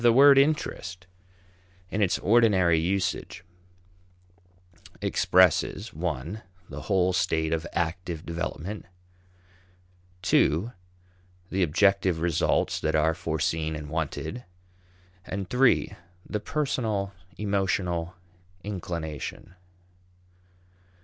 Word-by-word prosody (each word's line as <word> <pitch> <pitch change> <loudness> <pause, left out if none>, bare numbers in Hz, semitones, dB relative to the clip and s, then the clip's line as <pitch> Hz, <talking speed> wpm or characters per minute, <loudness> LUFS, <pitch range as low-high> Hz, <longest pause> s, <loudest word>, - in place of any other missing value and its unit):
The 120 0 +6
word 135 +3 +7
interest, 95 - -1 0.9
in 105 - -1
its 95 -3 +2
ordinary 95 -6 +4
usage, 90 +1 -2 1.6
expresses 90 -3 +2
(i) 85 +13 -4 0.3
the - - -7
whole 95 -2 +1
state 80 -2 +1
of 80 +1 -2
active 85 0 -3
development, 85 +4 -5 1.5
(ii) 90 +11 +3 0.8
the 95 - 0
objective 95 +1 +3
results 85 -2 +1
that 80 0 0
are 80 +1 +3
foreseen 80 -1 -1
and 75 -1 -7
wanted, 80 - -3 0.8
and 95 +1 -4
(iii) 125 +1 +3 0.3
the 105 - -2
personal 110 -7 -1 0.2
emotional 95 -4 -1 0.5
inclination. 85 -5 -5
90 Hz, 85 wpm, -27 LUFS, 80-105 Hz, 1.6 s, word